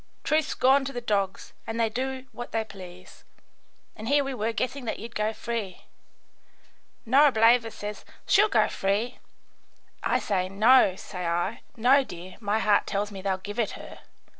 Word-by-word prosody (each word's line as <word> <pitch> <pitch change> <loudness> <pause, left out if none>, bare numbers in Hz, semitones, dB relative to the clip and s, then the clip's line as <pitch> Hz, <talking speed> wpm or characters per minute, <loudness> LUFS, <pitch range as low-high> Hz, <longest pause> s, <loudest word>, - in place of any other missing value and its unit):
"Truth's 310 0 +1
gone 270 +2 +4
to 275 - -4
the 245 - -3
dogs 200 -5 -2
and 225 +1 -3
they 230 - +3
do 260 +3 -4
what 240 - -8
they 225 -1 +1
please, 185 -4 -13 0.7
and 220 - -8
here 285 +2 +3
we 270 0 -4
were 225 -2 -1
guessing 255 +3 -3
that 220 - -3
you'd 230 +2 -9
go 215 +1 0
free. 220 -4 -5 1.2
Norableva 235 -3 +5
says, 210 -1 -7 0.2
'She'll 420 +2 +4
go - - +3
free.' 205 +6 -1 0.8
I - - +1
say, 185 -2 -1
'No,' 215 0 +5
say 180 -2 -6
I. 175 +6 -1 0.2
'No, 260 +5 +5
dear, 180 -4 -10
my 210 -1 0
heart 210 -2 +2
tells 205 +1 -2
me 195 -1 -8
they'll 190 -1 -1
give 205 +4 -7
it 220 -3 0
her. - - -11
220 Hz, 165 wpm, -26 LUFS, 200-250 Hz, 1.2 s, Norableva